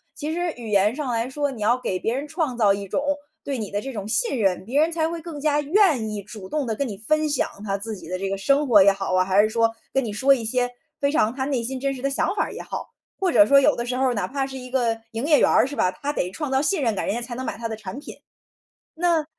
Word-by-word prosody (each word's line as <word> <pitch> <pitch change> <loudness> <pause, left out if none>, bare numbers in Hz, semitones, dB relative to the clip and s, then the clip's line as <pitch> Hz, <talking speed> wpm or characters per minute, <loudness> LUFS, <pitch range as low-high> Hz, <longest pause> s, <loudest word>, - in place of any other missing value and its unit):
其 305 +1 -4
实 350 0 -1
语 230 -2 -7
言 205 +1 +3
上 285 -4 -3
来 230 +1 -1
说， 285 +1 -1
你 240 -5 -9
要 235 +4 +3
给 190 -7 -2
别 225 +5 -1
人 280 +3 -3
创 290 -6 -2
造 205 -4 +4
一 200 0 -5
种， - - -1 0.4
对 275 -3 -3
你 210 -3 -4
的 205 - -2
这 270 +5 -6
种 205 -3 -5
信 220 +4 0
任， 190 -3 +1
别 260 +7 0
人 325 +2 +2
才 320 -1 0
会 335 0 -5
更 320 -3 -7
加 295 0 +2
愿 295 - +3
意 210 -1 -5
主 205 -2 -10
动 300 -2 -1
地 225 -2 -2
跟 280 +4 -1
你 205 -4 -6
分 310 +9 +1
享， 290 - +1 0.2
他 195 -2 -1
自 215 +2 -5
己 190 - -11
的 185 - -2
这 195 +1 -3
个 195 0 -3
生 280 +8 +2
活 215 -5 +7
也 200 +1 +7
好 195 -1 -3
啊， 185 0 +4
还 190 +2 +4
是 - - +3
说， 230 0 +2 0.2
跟 270 - +2
你 225 - -3
说 260 +7 +4
一 250 -4 -2
些 245 +2 0 0.3
非 280 0 +1
常 255 -8 +2
他 260 +1 -3
内 270 -4 0
心 260 +3 -4
真 275 +1 -1
实 255 - -8
的 275 - 0
想 275 - 0
法 - - +2
儿 - - -7
也 - - -6
好。 - - -6 0.3
或 375 -2 +1
者 310 - +6
说 280 0 +7
有 285 +2 +4
的 235 - -2
时 250 +1 -3
候， 260 -1 +2
哪 200 -5 -1
怕 270 +3 -2
是 265 0 -8
一 255 0 -9
个 240 -3 +1 0.2
营 225 +4 -2
业 300 -1 +5
员 - - +4
儿， - - +5
是 285 - -6
吧？ 185 - +2
他 285 +10 -4
得 180 - -1
创 285 - -5
造 265 0 +2
信 360 +5 +1
任 230 -3 +2
感， 195 - -2
人 - - -1
家 - - -1
才 240 +1 -6
能 255 +2 -5
买 - - -4
他 230 - -3
的 225 - -4
产 215 +1 -8
品。 290 - -10 0.8
那 335 -1 +2
250 Hz, 325 characters per minute, -23 LUFS, 215-285 Hz, 0.8 s, 活